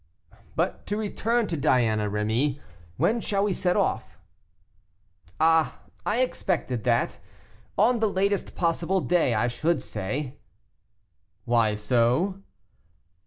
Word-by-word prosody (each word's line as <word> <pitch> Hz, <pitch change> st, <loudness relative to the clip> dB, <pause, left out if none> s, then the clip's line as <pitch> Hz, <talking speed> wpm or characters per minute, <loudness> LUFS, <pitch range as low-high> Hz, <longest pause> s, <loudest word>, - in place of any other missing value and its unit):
"But -, -, -1 dB
to 205 Hz, -, -1 dB
return 225 Hz, +2 st, 0 dB
to 170 Hz, -, -3 dB
Diana, 115 Hz, -8 st, +2 dB
Rémy; 110 Hz, +8 st, 0 dB, 0.4 s
when 230 Hz, +1 st, +2 dB
shall 200 Hz, -2 st, 0 dB
we 205 Hz, -2 st, +1 dB
set 180 Hz, -1 st, +1 dB
off?" -, -, -1 dB, 1.2 s
"Ah! 160 Hz, 0 st, +3 dB, 0.3 s
I 225 Hz, +4 st, +2 dB
expected 165 Hz, -, -1 dB
that. 120 Hz, -1 st, +1 dB, 0.6 s
On 230 Hz, +4 st, +4 dB
the 220 Hz, -1 st, +2 dB
latest 200 Hz, +1 st, -1 dB
possible 175 Hz, +2 st, 0 dB
day 170 Hz, -9 st, +2 dB
I 110 Hz, +3 st, +2 dB
should 160 Hz, +8 st, 0 dB
say." 130 Hz, +7 st, -4 dB, 1.1 s
"Why 115 Hz, -3 st, +2 dB
so?" 125 Hz, -, +1 dB
160 Hz, 115 wpm, -26 LUFS, 120-195 Hz, 1.2 s, On